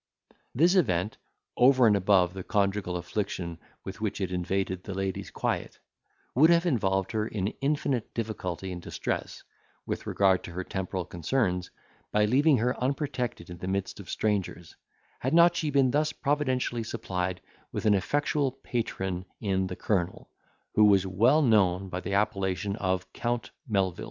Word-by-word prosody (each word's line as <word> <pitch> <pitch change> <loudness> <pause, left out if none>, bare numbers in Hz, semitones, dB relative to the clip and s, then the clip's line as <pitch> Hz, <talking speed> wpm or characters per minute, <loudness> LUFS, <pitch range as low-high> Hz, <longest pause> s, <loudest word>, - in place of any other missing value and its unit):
This 170 +8 +5
event, 105 - +1 0.4
over 130 0 +6
and 105 -2 +5
above 95 -2 +3
the 95 - -6
conjugal 100 -3 0
affliction 85 -2 -4 0.3
with 95 +3 -7
which 105 -2 -2
it 95 -2 -2
invaded 90 +1 -1
the 100 - -6
lady's 95 -1 -3
quiet, - - -3 0.6
would 155 +6 +6
have 170 +1 +4
involved 95 - +1
her 110 -1 -1
in 100 -2 -2
infinite 140 -4 0
difficulty 95 -5 -3
and 90 -1 -6
distress, - - -4 0.4
with - - -4
regard 95 -2 +3
to 85 - -8
her 95 +2 -3
temporal 95 -1 -3
concerns, 90 - -1 0.4
by 105 0 +3
leaving 140 +6 +4
her 125 +3 +1
unprotected 130 - -2
in 85 - -8
the 90 - -5
midst 95 +1 -2
of 100 - -10
strangers, 95 -5 -2 0.4
had 130 +5 0
not 170 0 +6
she 160 -3 -1
been 135 -3 +3
thus 150 +2 +1
providentially 130 -5 0
supplied 95 -5 -3 0.3
with - - -4
an 105 - +5
effectual 145 +7 +1
patron 95 -8 -3 0.2
in 95 -2 0
the 90 - -5
colonel, 95 -4 -2 0.4
who 105 - +6
was 100 -2 +5
known 100 - +3
by 90 - -3
the 100 +2 -3
appellation 100 -1 0
of 95 -2 -2
Count 120 0 -2 0.2
Melvil. 95 -5 0
100 Hz, 155 wpm, -28 LUFS, 95-125 Hz, 0.6 s, over